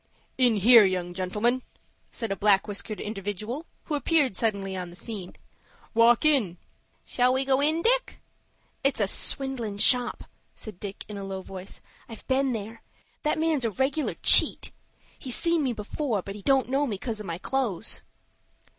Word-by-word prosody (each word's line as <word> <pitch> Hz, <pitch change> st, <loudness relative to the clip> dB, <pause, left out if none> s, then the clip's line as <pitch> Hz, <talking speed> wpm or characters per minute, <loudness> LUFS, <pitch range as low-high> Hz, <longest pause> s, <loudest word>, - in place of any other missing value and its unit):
"In 250 Hz, -3 st, +3 dB
here, 225 Hz, +3 st, +7 dB
young 180 Hz, -2 st, -1 dB
gentlemen," 210 Hz, +7 st, -1 dB, 0.5 s
said 225 Hz, -4 st, -4 dB
a -, -, 0 dB
black 195 Hz, +1 st, +2 dB
whiskered 205 Hz, +1 st, -4 dB
individual, 210 Hz, -, -5 dB, 0.2 s
who -, -, -6 dB
appeared 290 Hz, -, +1 dB
suddenly 200 Hz, -3 st, -1 dB
on 180 Hz, -1 st, -5 dB
the 175 Hz, -, -13 dB
scene. 195 Hz, -3 st, -8 dB, 0.6 s
"Walk 230 Hz, +3 st, +4 dB
in." 240 Hz, -, +3 dB, 0.5 s
"Shall 250 Hz, 0 st, +1 dB
we 265 Hz, +1 st, 0 dB
go 265 Hz, 0 st, +2 dB
in, 315 Hz, +3 st, +1 dB
Dick?" -, -, +1 dB, 0.6 s
"It's 275 Hz, -3 st, +1 dB
a 205 Hz, -, +1 dB
swindlin' 245 Hz, -2 st, 0 dB
shop," 245 Hz, +4 st, +3 dB, 0.3 s
said 210 Hz, -5 st, -9 dB
Dick, 200 Hz, -1 st, -8 dB
in 210 Hz, -, -8 dB
a -, -, -6 dB
low 190 Hz, -1 st, -6 dB
voice. 190 Hz, 0 st, -10 dB, 0.3 s
"I've 225 Hz, -, -11 dB
been 265 Hz, 0 st, +1 dB
there. 225 Hz, 0 st, -6 dB, 0.4 s
That 300 Hz, -, -1 dB
man's 315 Hz, -4 st, 0 dB
a 230 Hz, -, +1 dB
regular 270 Hz, +8 st, -1 dB
cheat. -, -, +7 dB, 0.5 s
He's 255 Hz, -2 st, -2 dB
seen 335 Hz, -1 st, +2 dB
me 265 Hz, -3 st, 0 dB
before, 220 Hz, -, -3 dB
but 195 Hz, -, -7 dB
he 205 Hz, -, -10 dB
don't 270 Hz, +5 st, +2 dB
know 280 Hz, +2 st, 0 dB
me 210 Hz, -5 st, -3 dB
coz 220 Hz, +1 st, -5 dB
of 210 Hz, -, -8 dB
my 165 Hz, -1 st, -4 dB
clothes." 225 Hz, -2 st, -2 dB
225 Hz, 170 wpm, -26 LUFS, 200-270 Hz, 0.6 s, here